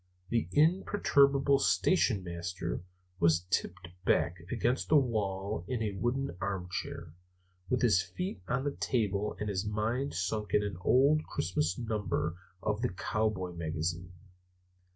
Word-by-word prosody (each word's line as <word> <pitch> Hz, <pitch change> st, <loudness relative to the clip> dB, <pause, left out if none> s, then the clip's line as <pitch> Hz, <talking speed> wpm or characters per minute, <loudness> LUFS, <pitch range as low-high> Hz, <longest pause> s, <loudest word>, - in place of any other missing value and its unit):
The 115 Hz, -7 st, +1 dB
imperturbable 140 Hz, -5 st, +4 dB
station 130 Hz, -, +2 dB
master 85 Hz, 0 st, -4 dB, 0.4 s
was 85 Hz, +1 st, +3 dB
tipped 90 Hz, 0 st, -1 dB
back 90 Hz, -1 st, +2 dB
against 125 Hz, +1 st, 0 dB
the 155 Hz, -, +5 dB
wall 105 Hz, -, -1 dB
in 120 Hz, -1 st, -1 dB
a 105 Hz, -, -1 dB
wooden 120 Hz, +4 st, -1 dB
armchair, 90 Hz, -5 st, -4 dB, 0.6 s
with 125 Hz, -, +1 dB
his 105 Hz, -7 st, +5 dB
feet 180 Hz, -, -5 dB
on 125 Hz, +4 st, 0 dB
the 145 Hz, -, 0 dB
table, 105 Hz, -7 st, -1 dB
and 105 Hz, -, -2 dB
his 95 Hz, -2 st, -1 dB
mind 110 Hz, +6 st, -1 dB
sunk 100 Hz, +2 st, -1 dB
in 105 Hz, -, +4 dB
an 100 Hz, -4 st, -4 dB
old 140 Hz, +9 st, +4 dB
Christmas 85 Hz, 0 st, -1 dB
number 105 Hz, -8 st, -1 dB, 0.3 s
of 105 Hz, +1 st, -1 dB
the 125 Hz, -, +1 dB
Cowboy 100 Hz, -1 st, -1 dB
Magazine. 85 Hz, +1 st, -3 dB
105 Hz, 130 wpm, -31 LUFS, 90-125 Hz, 0.6 s, the